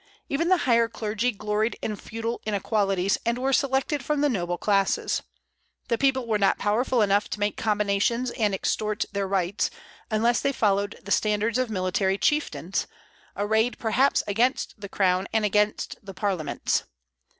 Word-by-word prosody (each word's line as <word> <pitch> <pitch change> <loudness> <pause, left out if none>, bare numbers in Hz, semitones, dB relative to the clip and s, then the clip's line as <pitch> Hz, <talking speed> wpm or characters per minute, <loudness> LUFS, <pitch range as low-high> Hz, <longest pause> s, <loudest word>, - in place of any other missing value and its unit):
Even 305 +5 0
the 370 - +5
higher 235 -2 +4
clergy 220 +2 -1
gloried 210 +2 -1
in 215 - -3
feudal 230 +3 -5
inequalities, 195 -2 +1
and 235 +1 0
were 265 +2 0
selected 270 +1 +1
from 295 +2 0
the 295 - +3
noble 175 -7 -1
classes. 195 +1 +1 0.7
The 235 - +2
people 265 -2 +2
were 220 -2 0
not 195 - +3
powerful 230 +3 +1
enough 205 0 +2
to - - -4
make 205 0 0
combinations 210 +3 0
and 210 -4 0
extort 210 +2 -1
their 200 -1 -2
rights, 190 0 0 0.4
unless 230 +2 +2
they 275 - 0
followed 205 -3 0
the 200 - -8
standards 215 +3 +1
of 255 -2 0
military 190 -1 0
chieftains, 300 +8 0 0.5
arrayed 220 +4 +1
perhaps 255 +5 +2
against 235 +6 +1
the 200 - -6
crown 185 -1 +1
and 220 -1 +1
against 210 +1 0
the 195 -1 -9
parliaments. 190 -6 -1
215 Hz, 155 wpm, -25 LUFS, 200-240 Hz, 0.7 s, the